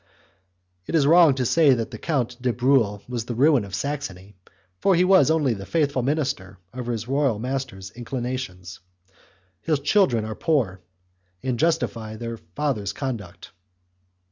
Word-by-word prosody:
It - - -2
is 150 -4 +4
wrong 165 -2 +6
to 130 -1 -1
say 140 +2 +5
that 115 -2 -4
the - - -8
Count 125 -6 -2
de 125 -1 +1
Bruhl 120 -5 +2
was 120 -2 -4
the 120 - -4
ruin 140 -1 +4
of 100 -1 -6
Saxony, 105 -10 -5 0.5
for 195 - +3
he 175 - +4
was 190 -3 +5
only 150 -6 +2
the 100 -3 -7
faithful 145 -5 +1
minister 130 -9 -2 0.2
of 125 -1 -6
his 115 -2 -3
royal 135 -4 +1
master's 120 -5 -4
inclinations. 120 -6 -5 0.8
His 155 -3 0
children 140 - +2
are 110 - -4
poor, 110 - 0 0.6
and 125 -3 -2
justify 115 -10 0
their 115 +1 -5
father's 100 - -3
conduct. 110 -12 -6
125 Hz, 150 wpm, -24 LUFS, 110-145 Hz, 0.8 s, wrong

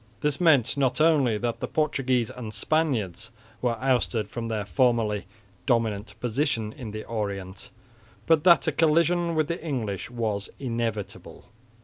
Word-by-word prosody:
This 150 +2 0
meant 145 -9 +4
not 130 -1 +1
only 145 -8 +4
that 120 +1 -2
the - - -3
Portuguese 130 -6 0
and 115 -4 -7
Spaniards 115 - -1 0.3
were 120 -2 0
ousted 115 -6 +1
from 115 +2 -5
their 110 -2 -2
formerly 115 -4 +1 0.4
dominant 110 -3 0
position 120 -3 -1
in 130 -6 -8
the 110 +1 -6
Orient, 100 -4 -5 0.6
but 160 -2 +3
that 170 -3 +6
a - - +2
collision 170 +1 +2
with 155 -2 +1
the 170 -1 -4
English 115 - -3
was 110 -4 -3
inevitable. 115 -5 -4
120 Hz, 140 wpm, -26 LUFS, 110-150 Hz, 0.6 s, that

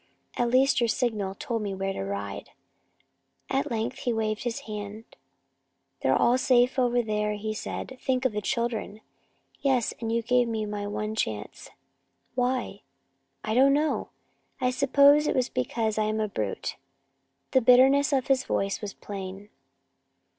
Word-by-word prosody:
At 240 -1 +1
least 260 +1 +4
your 235 - +3
signal 215 -5 -1
told 235 -5 -3
me 200 -2 -3
where 195 0 -2
to - - -4
ride." 100 0 -5 1.0
At 275 +2 0
length 230 +3 -2
he 245 - -1
waved 220 0 -2
his 235 -1 -2
hand. 210 0 -7 1.0
"They're - - +3 0.2
safe 250 0 +3
over 245 -1 +2
there," 210 -1 -1 0.2
said 215 - -5
he. 260 - -10
"Think 260 0 -1
of 260 - +3
the 210 0 -3
children!" 225 -1 -2 0.6
"Yes, 260 -5 +1
and 225 -1 -3
you 230 0 0
gave 245 +1 +3
me 220 -2 -2
my 205 -1 -4
one 215 +1 -3
chance. 110 - -4 0.6
Why?" 250 -5 -1 0.6
"I 215 - -2
don't 270 +3 +5
know. 300 +2 0 0.5
I 250 -1 +1
suppose 280 +3 +5
it - - 0
was 255 -1 +1
because 220 - -1
I 215 - +2
am 215 +1 -1
a 215 - 0
brute!" 205 - -4 0.7
The 260 - +4
bitterness 265 +4 +5
of 265 -3 +1
his 270 -1 +2
voice 195 -5 -1
was 205 -2 -6
plain. 195 0 -7
230 Hz, 155 wpm, -27 LUFS, 210-255 Hz, 1.0 s, don't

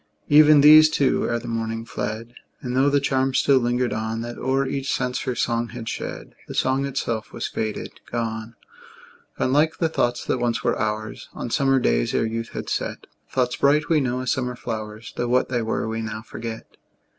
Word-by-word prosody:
Even 150 0 +7
these, 155 +1 +9
too, 140 -3 +1
ere 120 - +1
the 120 +1 -7
morning, 115 0 -3
fled; 115 +1 -5 0.3
And, 125 0 -4
tho' 135 +2 +4
the 145 0 +3
charm 135 -1 0
still 135 -2 +4
lingered 120 0 0
on, 110 +1 -3
That 120 +1 -6
o'er 135 +1 +1
each 135 +1 -2
sense 125 0 -1
her 130 -2 -2
song 120 0 0
had 120 -2 -8
shed, - - -5
The - - -7
song 135 +1 +1
itself 120 -5 -3
was - - -4
faded, 110 -1 -4
gone; 115 -1 -3 0.8
Gone, 130 - 0
like 155 +2 +3
the 165 - +1
thoughts 120 -6 0
that - - 0
once 120 -1 -1
were - - +2
ours, 110 0 -3
On 120 - -5
summer 135 0 +3
days, - - +1
ere - - +2
youth 115 +1 -3
had - - -5
set; - - -3 0.3
Thoughts 125 -2 0
bright, 145 +1 +3
we 160 -3 +4
know, 125 -1 -1
as 130 - -1
summer 125 -1 -1
flowers, 110 -1 -6
Tho' 120 - -1
what 125 +1 +2
they 120 -2 0
were 110 0 -2
we 110 0 -3
now 110 -1 -5
forget. 115 -1 -8
120 Hz, 200 wpm, -23 LUFS, 115-135 Hz, 0.8 s, these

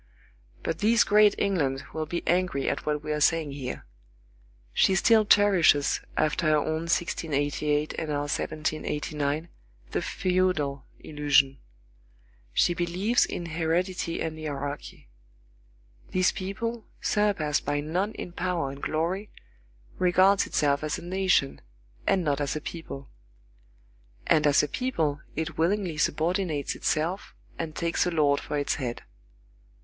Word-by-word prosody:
But 165 0 -2
this 225 +2 +4
great 210 0 +5
England 145 -9 0
will 155 -1 -3
be 170 +2 -4
angry 175 -6 +1
at - - -2
what 150 0 -1
we 150 - -3
are 150 0 -1
saying 160 -1 +2
here. 135 -2 -6 0.9
She 190 - +4
still 220 +3 +5
cherishes, 185 -9 +4 0.2
after 155 +2 +1
her 155 0 +4
own 160 +2 -2
1688 150 -3 0
and 160 - -4
our 145 -1 0
1789, 150 +1 -2 0.4
the - - -1
feudal 180 -7 0
illusion. 140 -3 +2 0.9
She 175 - +3
believes 180 +7 +1
in 175 - -5
heredity 170 +2 -1
and 160 -1 -4
hierarchy. 145 - -6 1.0
This 185 0 +2
people, 225 +5 -4
surpassed 200 -8 +1
by 145 0 -1
none 180 +8 -1
in 180 - -7
power 175 -5 -2
and 140 +1 -10
glory, 180 +7 -2 0.7
regards 185 +2 +4
itself 145 0 +1
as 155 - -1
a - - -9
nation, 180 -6 +1 0.5
and 190 -2 +3
not 145 -2 0
as 140 0 -1
a 155 - -3
people. 145 -5 -8 1.1
And 150 -1 +4
as 145 +1 +4
a - - 0
people, 160 - -1
it 160 -1 -4
willingly 175 -2 0
subordinates 160 -1 0
itself 170 +6 -2 0.2
and 160 -2 -4
takes 170 +1 0
a - - +2
lord 150 -4 +2
for 150 - -4
its 145 - 0
head. 120 -2 -4
160 Hz, 135 wpm, -27 LUFS, 145-185 Hz, 1.1 s, great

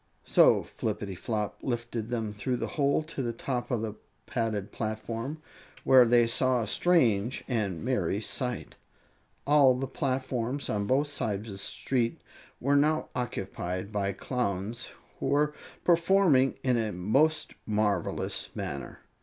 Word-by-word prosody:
So - - +5
Flippityflop 105 +2 -3
lifted 120 -3 -3
them 115 -3 -2
through 125 +5 -2
the - - -3
hole 140 +1 +2
to 155 -3 -5
the 120 -2 -1
top 120 +1 -3
of 120 -4 0
the 110 -2 -3 0.3
padded 110 -5 -2
platform, 115 +7 -4 0.4
where 130 -2 +7
they 120 0 +5
saw 125 +1 +2
a - - -1
strange 120 - +2
and 105 -7 -1
merry 100 -7 0
sight. 125 +3 -3 0.7
All 140 -2 +6
the 130 +2 -2
platforms 130 -1 -2
on 100 -1 -1
both 140 +6 +2
sides 110 -6 -3
of - - -6
the 95 - -7
street 115 +3 -1 0.4
were 140 +3 +2
now 155 +2 +2
occupied 95 -5 -4
by 100 -2 0
Clowns, 110 +1 -3 0.3
who - - -2
were 150 +1 +2 0.3
performing 170 -6 +4
in 125 -2 +2
a 110 -2 0
most 135 - +1
marvelous 105 -1 -1
manner. 70 0 -5
120 Hz, 135 wpm, -29 LUFS, 105-135 Hz, 0.7 s, where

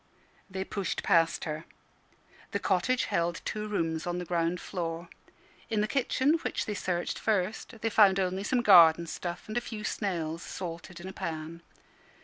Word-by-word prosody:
They 190 0 -3
pushed 195 0 -3
past 165 -4 +3
her. 155 +1 -4 0.9
The - - +2
cottage 195 +7 +1
held 170 0 0
two 215 0 -3
rooms 165 -5 -1
on 175 0 -1
the 180 - -4
ground 170 +1 0
floor. 170 -1 -4 0.6
In 215 -2 +1
the 210 - +1
kitchen, 270 +5 +2
which - - -2
they 210 - -2
searched 175 -3 -2
first, 215 +2 -1
they 225 - +1
found 195 -3 +6
only 190 +1 0
some 245 +2 +1
garden 170 -5 +8
stuff 175 +1 -5
and 215 +2 -3
a - - +2
few 220 -3 -6
snails 170 -7 -2
salted 175 -1 -7
in 180 - -8
a 190 - -7
pan. 160 -1 -5
180 Hz, 165 wpm, -29 LUFS, 170-210 Hz, 0.9 s, garden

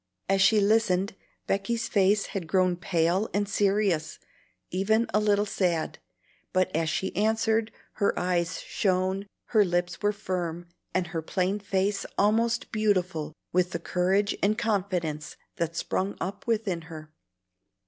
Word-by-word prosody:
As 195 0 +2
she 210 +2 +6
listened, 200 -2 +2 0.3
Becky's 210 +4 -1
face 200 0 +3
had 185 -5 -3
grown 185 0 +2
pale 175 +3 +1
and 205 0 +1
serious, 195 -6 +1 0.5
even 220 +5 +2
a 210 - +4
little 205 -1 +2
sad; 180 -5 -1 0.5
but 185 -1 +1
as 160 0 +1
she 190 +3 -2
answered, 220 +2 +1 0.2
her 200 - +1
eyes 175 -2 0
shone, 190 +1 0 0.2
her 215 -3 +5
lips 175 -1 -1
were 205 0 +3
firm, 175 -4 -3 0.3
and 185 -1 0
her 165 - -1
plain 185 +5 -1
face 195 0 0
almost 230 +3 +2
beautiful 185 -8 0 0.2
with 180 0 +2
the 170 - -1
courage 185 +4 +1
and 210 +2 +2
confidence 180 -9 -1 0.2
that 170 0 -2
sprung 190 +3 -2
up 200 +8 -5
within 210 -7 0
her. 155 -1 -9
195 Hz, 140 wpm, -27 LUFS, 175-210 Hz, 0.5 s, she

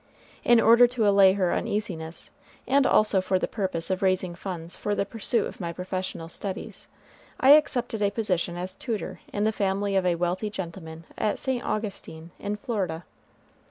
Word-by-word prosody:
In 240 -1 +5
order 235 +2 +7
to 240 -3 0
allay 195 -2 +6
her 185 -3 +1
uneasiness, 175 -6 -3 0.3
and 275 0 +3
also 210 -3 +3
for 185 0 +1
the - - -1
purpose 185 -5 -3
of 185 - -1
raising 185 -2 +1
funds 170 -2 -6
for 205 - -2
the 200 - 0
pursuit 225 +1 0
of - - -8
my 170 -1 -3
professional 185 -1 -5
studies, 190 +4 -6 0.5
I 270 - +6
accepted 255 -7 +3
a 200 - +3
position 185 -5 -1
as 185 +1 -4
tutor 220 +1 -4
in 205 - -1
the 220 - +3
family 200 -1 -1
of 190 -1 +2
a 175 - +2
wealthy 180 +5 -1
gentleman 170 -4 -7 0.2
at 210 - 0
St. 260 -2 -1
Augustine, 190 -6 -5
in 205 +1 -3
Florida. 190 -8 -3
195 Hz, 170 wpm, -26 LUFS, 180-215 Hz, 0.5 s, order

